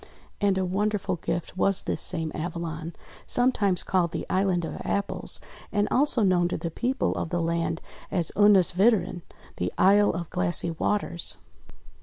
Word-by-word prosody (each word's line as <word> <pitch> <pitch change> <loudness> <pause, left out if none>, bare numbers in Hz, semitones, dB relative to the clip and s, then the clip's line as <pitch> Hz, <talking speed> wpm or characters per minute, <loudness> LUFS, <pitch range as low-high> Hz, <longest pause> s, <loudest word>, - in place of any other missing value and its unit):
And 200 -2 +2
a 190 - +1
wonderful 200 0 -1
gift 170 +1 -4
was 195 +1 +2
this - - -2
same 160 -1 -2
Avalon, 165 0 -4 0.3
sometimes 215 -7 +2
called 175 -3 +1
the - - -3
Island 185 -3 +1
of - - -6
Apples, 200 - -2 0.3
and 205 -1 +1
also 265 -4 +3
known 180 -3 +3
to 175 - -2
the 170 - -4
people 250 +9 0
of - - -3
the 175 - -1
land 165 0 -1 0.3
as 175 -4 0
Ynis 205 -4 +5
witren, 190 -3 +2 0.4
the - - -1
Isle 205 +2 +5
of 170 -1 -4
Glassy 90 - +1
Waters. 170 0 -2
185 Hz, 155 wpm, -26 LUFS, 170-205 Hz, 0.4 s, Ynis